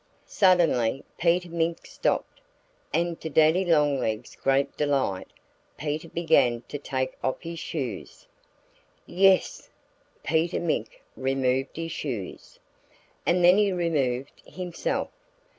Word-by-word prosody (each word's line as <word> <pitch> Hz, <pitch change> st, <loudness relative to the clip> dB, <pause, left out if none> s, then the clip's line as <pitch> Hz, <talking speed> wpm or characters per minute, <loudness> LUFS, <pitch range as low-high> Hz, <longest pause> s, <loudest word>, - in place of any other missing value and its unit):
Suddenly 165 Hz, -, +3 dB, 0.2 s
Peter 175 Hz, +1 st, +2 dB
Mink 165 Hz, 0 st, -1 dB
stopped. -, -, -2 dB, 0.5 s
And 170 Hz, 0 st, -1 dB
to 160 Hz, -, -4 dB
Daddy 160 Hz, +5 st, +4 dB
Longlegs' 140 Hz, -, +1 dB
great 135 Hz, +1 st, +1 dB
delight 135 Hz, -10 st, 0 dB, 0.5 s
Peter 155 Hz, +2 st, -3 dB
began 140 Hz, -8 st, +2 dB
to 145 Hz, -, -5 dB
take 130 Hz, -2 st, -2 dB
off 130 Hz, -, -1 dB
his 170 Hz, -1 st, -6 dB
shoes. 135 Hz, -, -5 dB, 0.8 s
Yes! 190 Hz, +1 st, +2 dB, 0.5 s
Peter 160 Hz, +3 st, +1 dB
Mink -, -, -3 dB
removed 135 Hz, 0 st, 0 dB
his 165 Hz, 0 st, -4 dB
shoes. 120 Hz, -13 st, -6 dB, 0.7 s
And 175 Hz, 0 st, +4 dB
then 180 Hz, +3 st, +7 dB
he 205 Hz, -2 st, +3 dB
removed 145 Hz, -7 st, -1 dB
himself. 180 Hz, -2 st, -3 dB
155 Hz, 110 wpm, -26 LUFS, 135-170 Hz, 0.8 s, then